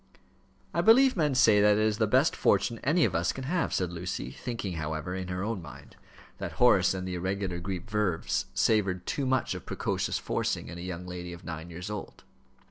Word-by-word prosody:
"I -, -, +2 dB
believe 260 Hz, +4 st, +6 dB
men 150 Hz, -6 st, +1 dB
say 110 Hz, -5 st, +6 dB
that 105 Hz, 0 st, +5 dB
it 110 Hz, -, +2 dB
is 110 Hz, 0 st, +1 dB
the 110 Hz, -, +3 dB
best 130 Hz, +8 st, +3 dB
fortune 115 Hz, -2 st, +2 dB
any 155 Hz, +4 st, +3 dB
of 95 Hz, -, -1 dB
us 85 Hz, 0 st, +1 dB
can 135 Hz, -, -7 dB
have," 170 Hz, +6 st, 0 dB
said 90 Hz, -2 st, -1 dB
Lucy, 85 Hz, -6 st, -4 dB
thinking, 105 Hz, -, -5 dB
however, 80 Hz, +2 st, -3 dB
in 95 Hz, -1 st, -4 dB
her 90 Hz, +1 st, -3 dB
own 110 Hz, -3 st, -2 dB
mind, 70 Hz, -4 st, -12 dB, 0.4 s
that -, -, -4 dB
Horace 95 Hz, -7 st, +4 dB
and 95 Hz, 0 st, -4 dB
the 90 Hz, -, -3 dB
irregular 95 Hz, 0 st, -2 dB
Greek 90 Hz, -1 st, -5 dB
verbs 105 Hz, -5 st, -1 dB
savoured 95 Hz, -5 st, +2 dB
too 140 Hz, -2 st, -2 dB
much 130 Hz, -1 st, +1 dB
of -, -, -8 dB
precocious -, -, -1 dB
forcing -, -, -2 dB
in 85 Hz, -, -7 dB
a -, -, -6 dB
young 90 Hz, 0 st, -5 dB
lady 90 Hz, -1 st, -6 dB
of 85 Hz, +1 st, -11 dB
nine 80 Hz, 0 st, -6 dB
years 90 Hz, +4 st, -7 dB
old. 105 Hz, -, -7 dB
95 Hz, 210 wpm, -29 LUFS, 90-115 Hz, 0.4 s, believe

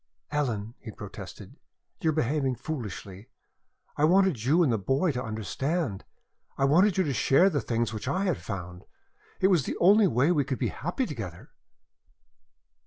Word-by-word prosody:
"Ellen," 120 Hz, -7 st, -2 dB
he 115 Hz, -, -10 dB
protested, 110 Hz, -, -10 dB, 0.4 s
"you 160 Hz, -, +1 dB
are -, -, +4 dB
behaving 140 Hz, -2 st, 0 dB
foolishly. 105 Hz, -8 st, -7 dB, 0.7 s
I 145 Hz, -, 0 dB
wanted 180 Hz, -, +3 dB
you 155 Hz, +8 st, +4 dB
and 130 Hz, -7 st, +2 dB
the 110 Hz, -, 0 dB
boy 135 Hz, -, +1 dB
to 125 Hz, -2 st, -3 dB
understand. 115 Hz, -, -3 dB, 0.5 s
I 135 Hz, -, +2 dB
wanted 180 Hz, +8 st, +4 dB
you 190 Hz, -, +4 dB
to 145 Hz, -5 st, -1 dB
share 175 Hz, +10 st, +4 dB
the 145 Hz, -, 0 dB
things 115 Hz, -1 st, -1 dB
which 110 Hz, +3 st, -6 dB
I 185 Hz, +8 st, 0 dB
had 180 Hz, -7 st, 0 dB
found. 90 Hz, -3 st, -7 dB, 0.6 s
It 190 Hz, -, +5 dB
was 170 Hz, -9 st, +3 dB
the -, -, -3 dB
only 200 Hz, +3 st, +6 dB
way 130 Hz, +8 st, +2 dB
we 150 Hz, -5 st, +2 dB
could 130 Hz, -1 st, -3 dB
be -, -, -1 dB
happy 175 Hz, -, -3 dB
together." 95 Hz, -, -7 dB
135 Hz, 170 wpm, -27 LUFS, 115-170 Hz, 0.7 s, only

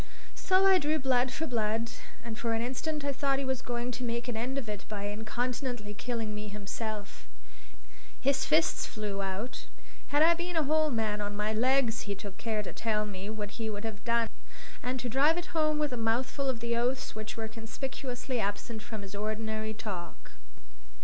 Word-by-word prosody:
So 375 Hz, +1 st, +4 dB
I 380 Hz, -1 st, +8 dB
drew 305 Hz, 0 st, +2 dB
blood 260 Hz, -2 st, +3 dB
for 320 Hz, -, -1 dB
blood; 230 Hz, -3 st, 0 dB, 0.3 s
and 230 Hz, -1 st, -4 dB
for 230 Hz, 0 st, 0 dB
an 225 Hz, -, +1 dB
instant 285 Hz, +4 st, -2 dB
I 285 Hz, -, +2 dB
thought 275 Hz, 0 st, +2 dB
he 275 Hz, -, -1 dB
was 260 Hz, -1 st, 0 dB
going 240 Hz, 0 st, -2 dB
to 250 Hz, +1 st, -4 dB
make 235 Hz, 0 st, -1 dB
an 240 Hz, -, -1 dB
end 250 Hz, +5 st, -1 dB
of 265 Hz, -5 st, -2 dB
it 210 Hz, -2 st, -3 dB
by 205 Hz, -2 st, -3 dB
incontinently 225 Hz, +2 st, -2 dB
killing 225 Hz, 0 st, -2 dB
me 210 Hz, 0 st, -4 dB
himself. 210 Hz, 0 st, -4 dB, 0.9 s
His 275 Hz, +1 st, +3 dB
fists 325 Hz, +3 st, +3 dB
flew 210 Hz, -3 st, -2 dB
out. 195 Hz, +7 st, -3 dB, 0.4 s
Had 290 Hz, +2 st, +5 dB
I 335 Hz, +1 st, +8 dB
been 345 Hz, +1 st, -3 dB
a 320 Hz, -, +5 dB
whole 310 Hz, +2 st, +4 dB
man 220 Hz, -4 st, 0 dB
on 205 Hz, 0 st, -2 dB
my 210 Hz, +1 st, +1 dB
legs, 245 Hz, 0 st, +3 dB
he 200 Hz, -, 0 dB
took 200 Hz, 0 st, -8 dB
care 220 Hz, -2 st, 0 dB
to -, -, -6 dB
tell 215 Hz, -2 st, +1 dB
me 200 Hz, -1 st, -5 dB
what 210 Hz, -1 st, -3 dB
he 225 Hz, -2 st, -3 dB
would 205 Hz, 0 st, -3 dB
have 220 Hz, -2 st, -4 dB
done, 235 Hz, -1 st, +3 dB, 0.5 s
and 255 Hz, +1 st, -1 dB
to 245 Hz, -, -2 dB
drive 285 Hz, +7 st, +5 dB
it 350 Hz, +1 st, -4 dB
home 310 Hz, -2 st, +3 dB
with 300 Hz, -3 st, +1 dB
a -, -, -1 dB
mouthful 245 Hz, +5 st, +1 dB
of 240 Hz, -3 st, -1 dB
the 235 Hz, 0 st, +1 dB
oaths 250 Hz, +2 st, +1 dB
which 215 Hz, +1 st, -5 dB
were 220 Hz, -1 st, -2 dB
conspicuously 245 Hz, +2 st, -3 dB
absent 215 Hz, +2 st, -2 dB
from 220 Hz, -2 st, -6 dB
his 195 Hz, 0 st, -8 dB
ordinary 215 Hz, +1 st, -1 dB
talk. 185 Hz, -6 st, -6 dB
235 Hz, 195 wpm, -31 LUFS, 215-265 Hz, 0.9 s, I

